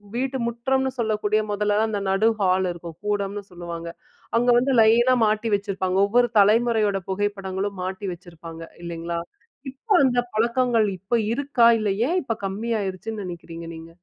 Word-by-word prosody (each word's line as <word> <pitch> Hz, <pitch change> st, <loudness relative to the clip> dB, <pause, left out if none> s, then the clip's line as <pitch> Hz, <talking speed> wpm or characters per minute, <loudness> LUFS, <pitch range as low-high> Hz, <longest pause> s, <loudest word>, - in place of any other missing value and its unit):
வீட்டு 265 Hz, +1 st, -1 dB
முற்றம்னு 265 Hz, +3 st, 0 dB
சொல்லக்கூடிய 215 Hz, -1 st, +1 dB
மொதல்லதான் 210 Hz, +1 st, +1 dB
அந்த 205 Hz, -, -1 dB
நடு 195 Hz, +4 st, +3 dB
ஹால் 190 Hz, -1 st, +2 dB
இருக்கும். 170 Hz, -1 st, -9 dB
கூடம்னு 205 Hz, 0 st, -2 dB
சொல்லுவாங்க. 170 Hz, -1 st, -7 dB, 0.5 s
அங்க 245 Hz, +1 st, +2 dB
வந்து 255 Hz, +3 st, +2 dB
லைனா 235 Hz, +3 st, +5 dB
மாட்டி 215 Hz, +2 st, 0 dB
வச்சுருப்பாங்க. 195 Hz, -2 st, -2 dB
ஒவ்வொரு 240 Hz, +3 st, +3 dB
தலைமுறையோட 215 Hz, -1 st, +3 dB
புகைப்படங்களும் 195 Hz, 0 st, -2 dB
மாட்டி 190 Hz, +2 st, -4 dB
வச்சுருப்பாங்க. 165 Hz, -1 st, -11 dB, 0.2 s
இல்லைங்களா? 170 Hz, 0 st, -4 dB, 0.5 s
இப்ப 285 Hz, -, -35 dB, 0.2 s
அந்த 245 Hz, -1 st, +2 dB
பழக்கங்கள் 235 Hz, 0 st, +2 dB
இப்ப 220 Hz, +6 st, 0 dB
இருக்கா? 275 Hz, -3 st, +3 dB
இல்ல 215 Hz, -1 st, 0 dB, 0.2 s
ஏன் 360 Hz, -, +1 dB
இப்ப 235 Hz, -4 st, -1 dB
கம்மி 215 Hz, +5 st, -4 dB
ஆயிடுச்சுன்னு 205 Hz, +2 st, -4 dB
நெனைக்கிறீங்க 170 Hz, -1 st, -8 dB
நீங்க? 165 Hz, +1 st, -11 dB
205 Hz, 140 wpm, -23 LUFS, 185-235 Hz, 0.5 s, லைனா